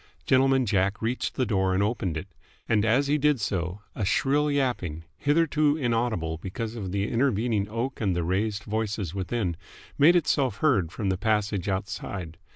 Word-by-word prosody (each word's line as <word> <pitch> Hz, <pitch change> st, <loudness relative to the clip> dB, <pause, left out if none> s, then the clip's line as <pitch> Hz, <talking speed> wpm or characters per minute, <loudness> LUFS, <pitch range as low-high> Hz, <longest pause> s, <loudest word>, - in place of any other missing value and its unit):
Gentleman 130 Hz, 0 st, +4 dB
Jack 100 Hz, -1 st, +1 dB
reached 115 Hz, +3 st, -2 dB
the 130 Hz, -, +1 dB
door 95 Hz, -3 st, +1 dB
and 100 Hz, -, +2 dB
opened 100 Hz, -7 st, -1 dB
it: 90 Hz, -, -6 dB, 0.4 s
and 105 Hz, -2 st, +2 dB
as 120 Hz, +6 st, +3 dB
he 150 Hz, +2 st, +1 dB
did 150 Hz, -2 st, +3 dB
so 95 Hz, -1 st, -2 dB
a 110 Hz, -, -3 dB
shrill 145 Hz, +9 st, +2 dB
yapping, 120 Hz, -, -1 dB
hitherto 150 Hz, 0 st, +2 dB
inaudible 115 Hz, -, -1 dB
because 110 Hz, +6 st, -5 dB
of 100 Hz, -5 st, -5 dB
the 100 Hz, +1 st, -1 dB
intervening 115 Hz, -4 st, +1 dB
oak 115 Hz, +5 st, -3 dB
and 95 Hz, -5 st, +1 dB
the 85 Hz, -, 0 dB
raised 100 Hz, +4 st, -1 dB
voices 105 Hz, -5 st, -2 dB
within, 95 Hz, -1 st, -2 dB, 0.4 s
made 160 Hz, +5 st, +7 dB
itself 135 Hz, -, +1 dB
heard 100 Hz, -, +2 dB
from 100 Hz, -1 st, -2 dB
the 95 Hz, -1 st, -1 dB
passage 105 Hz, -3 st, 0 dB
outside. 95 Hz, -4 st, -4 dB
110 Hz, 165 wpm, -26 LUFS, 95-130 Hz, 0.4 s, made